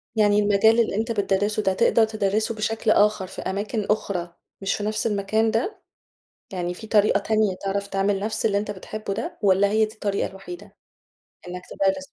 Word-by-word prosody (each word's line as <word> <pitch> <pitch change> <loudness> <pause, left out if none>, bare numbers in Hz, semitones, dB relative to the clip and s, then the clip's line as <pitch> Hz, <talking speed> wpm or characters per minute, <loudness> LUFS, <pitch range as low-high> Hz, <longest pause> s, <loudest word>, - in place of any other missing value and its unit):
يعني 210 -1 +4
المجال 210 +3 +4
اللي 220 -3 +1
أنت 225 +2 -1
بتدَرِّسه 205 0 0
ده 190 - +2
تقدر 225 +4 +4
تدَرِّسه 215 +1 -1
بشكل 220 +1 0
آخر 210 -2 +3
في - - -8
أماكن 205 +2 -3
أخرى 185 -5 -1 0.3
مش 195 - 0
في 205 - -5
نفس 215 +2 -1
المكان 215 +2 +1
ده؟ 230 - -2 0.7
يعني 175 -1 -2
في 220 +4 -10
طريقة 210 -1 +3
تانية 215 -2 +1
تعرف 200 +1 -1
تعمل 195 0 0
نفس 215 +2 -2
اللي 200 -2 +2
أنت 205 0 -2
بتحبه 205 +1 -6
ده، 225 - -5
والَّا 200 0 +4
هي 220 +1 +3
دي 215 - -11
الطريقة 200 -2 -2
الوحيدة 190 -1 -11 0.7
إنَّك 180 0 -6
تدَرِّس 285 -1 0
210 Hz, 180 wpm, -24 LUFS, 195-220 Hz, 0.7 s, يعني